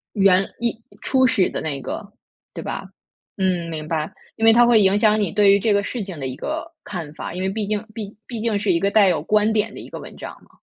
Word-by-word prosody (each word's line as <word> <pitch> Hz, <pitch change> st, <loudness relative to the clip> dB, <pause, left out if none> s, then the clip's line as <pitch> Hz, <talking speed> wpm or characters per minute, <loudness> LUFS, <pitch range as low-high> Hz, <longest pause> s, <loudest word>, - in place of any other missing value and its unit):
原 195 Hz, -1 st, +4 dB
一 235 Hz, -1 st, -2 dB, 0.2 s
初 260 Hz, -1 st, +3 dB
始 230 Hz, -7 st, +3 dB
的 -, -, -4 dB
那 140 Hz, -3 st, -3 dB
个， 200 Hz, +8 st, -6 dB, 0.4 s
对 -, -, -6 dB
吧？ -, -, -5 dB, 0.5 s
嗯， 180 Hz, -3 st, 0 dB
明 155 Hz, -1 st, -5 dB
白。 155 Hz, -1 st, -2 dB, 0.2 s
因 225 Hz, -, 0 dB
为 225 Hz, -, +8 dB
它 240 Hz, +1 st, +6 dB
会 235 Hz, -2 st, +5 dB
影 195 Hz, +1 st, +4 dB
响 215 Hz, 0 st, +4 dB
你 195 Hz, -5 st, 0 dB
对 205 Hz, +1 st, +5 dB
于 200 Hz, -, +4 dB
这 215 Hz, 0 st, +2 dB
个 200 Hz, -, +2 dB
事 235 Hz, +1 st, -4 dB
情 185 Hz, -5 st, -8 dB
的 135 Hz, -, -3 dB
一 130 Hz, -, -5 dB
个 325 Hz, -, -5 dB
看 170 Hz, -7 st, -6 dB
法， 160 Hz, -, -6 dB
因 180 Hz, -, -4 dB
为 190 Hz, -, 0 dB
毕 210 Hz, +1 st, -3 dB
竟 210 Hz, 0 st, -1 dB
毕 210 Hz, -2 st, -7 dB
毕 235 Hz, -3 st, -5 dB
竟 220 Hz, -3 st, 0 dB
是 205 Hz, -2 st, +1 dB
一 170 Hz, -, +2 dB
个 200 Hz, +3 st, +1 dB
带 205 Hz, -1 st, +5 dB
有 175 Hz, -5 st, +1 dB
观 210 Hz, +6 st, +2 dB
点 220 Hz, +1 st, 0 dB
的 -, -, -9 dB
一 -, -, -10 dB
个 -, -, -7 dB
文 -, -, -10 dB
章 -, -, -8 dB
嘛。 -, -, -25 dB
200 Hz, 280 characters per minute, -22 LUFS, 180-220 Hz, 0.5 s, 为